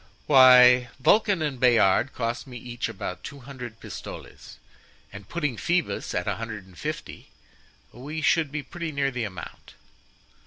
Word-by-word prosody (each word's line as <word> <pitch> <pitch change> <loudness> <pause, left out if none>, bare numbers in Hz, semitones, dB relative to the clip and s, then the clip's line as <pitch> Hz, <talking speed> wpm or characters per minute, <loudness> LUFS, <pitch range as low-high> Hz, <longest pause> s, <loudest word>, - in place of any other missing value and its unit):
"Why, 125 -2 +7
Vulcan 205 +4 +3
and 140 -4 -3
Bayard 120 +1 +4
cost 120 +3 -4
me 125 -2 -9
each 120 0 -5
about 95 -4 -6
two 140 -1 -9
hundred 125 -4 -9
pistoles, - - -10 0.6
and 100 -1 -11
putting 150 -8 -2
Phoebus 175 +6 -1
at 90 - -2
a 100 - -1
hundred 110 -3 -6
and 95 -2 -18
fifty, - - -7 0.6
we 145 +5 -7
should 160 -4 +2
be 150 -1 -4
pretty 170 0 -6
near 140 -1 -1
the 120 -3 -3
amount." 95 -5 -10
125 Hz, 150 wpm, -25 LUFS, 115-145 Hz, 0.6 s, Why